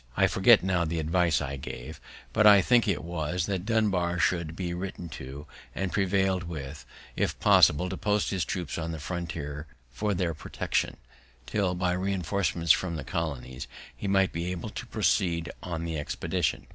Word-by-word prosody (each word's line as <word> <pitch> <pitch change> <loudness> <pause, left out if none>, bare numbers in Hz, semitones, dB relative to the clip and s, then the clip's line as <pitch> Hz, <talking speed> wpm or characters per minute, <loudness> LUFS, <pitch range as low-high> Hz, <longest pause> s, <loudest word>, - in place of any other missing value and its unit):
I - - +5
forget - - +5
now 95 -2 +1
the 85 +1 -2
advice 80 0 +2
I 70 -1 -4
gave; 65 -1 -8 0.3
but 105 - +5
I 100 -1 +9
think 120 +4 +4
it 100 -4 0
was, 85 0 -2
that 95 -1 -3
Dunbar 95 -6 +1
should 85 -2 0
be 90 -1 -3
written 90 -1 -5
to, 70 +1 -8 0.3
and 95 -1 -2
prevail'd 95 -1 +1
with, 75 -6 -7 0.3
if - - -1
possible, 75 +5 +5
to 95 0 -4
post 105 0 0
his 95 -4 0
troops 90 +1 -3
on 80 0 -3
the 80 - -5
frontiers 80 -3 -5 0.2
for 100 - -1
their 85 -2 0
protection, 75 - -2 0.5
till, 95 -4 0
by 90 0 0
reinforcements 90 -2 0
from 85 -3 +2
the 75 - -4
colonies, 65 -3 -4 0.3
he 100 - -5
might 95 -1 +3
be 85 +1 -3
able 90 -3 -4
to - - -7
proceed 85 -4 +1
on 85 -2 -4
the 80 -2 -3
expedition. 75 - -2
85 Hz, 170 wpm, -28 LUFS, 80-95 Hz, 0.5 s, I